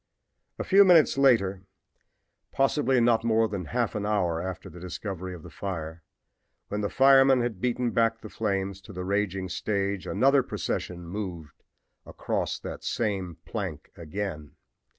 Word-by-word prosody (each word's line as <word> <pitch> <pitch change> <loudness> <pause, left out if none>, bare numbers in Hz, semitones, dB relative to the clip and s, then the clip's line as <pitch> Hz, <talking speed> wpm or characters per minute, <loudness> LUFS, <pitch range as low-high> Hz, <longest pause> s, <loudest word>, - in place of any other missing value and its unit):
A - - -3
few 200 +1 +6
minutes 175 -5 +5
later, 115 -9 +3 0.9
possibly 135 -1 +2
not 115 -1 +3
more 115 -1 +3
than 100 -4 -4
half 120 +1 -1
an 105 - -3
hour 90 -6 0
after 95 +1 -6
the 90 -1 -11
discovery 90 0 -6
of 80 - -12
the - - -11
fire, 80 -4 -5 0.7
when 105 +1 -2
the 100 - -1
firemen 135 -1 +6
had 115 -6 -3
beaten 125 -1 0
back 115 0 +1
the - - -8
flames 100 -3 -2
to 100 - -12
the 90 0 -5
raging 100 -1 -1
stage 100 0 -2
another 135 +6 +4
procession 90 -7 -4
moved 90 -5 -6 0.4
across - - -3
that - - -8
same 95 -7 -2
plank - - -5
again. 85 -3 -6
100 Hz, 150 wpm, -27 LUFS, 90-120 Hz, 0.9 s, few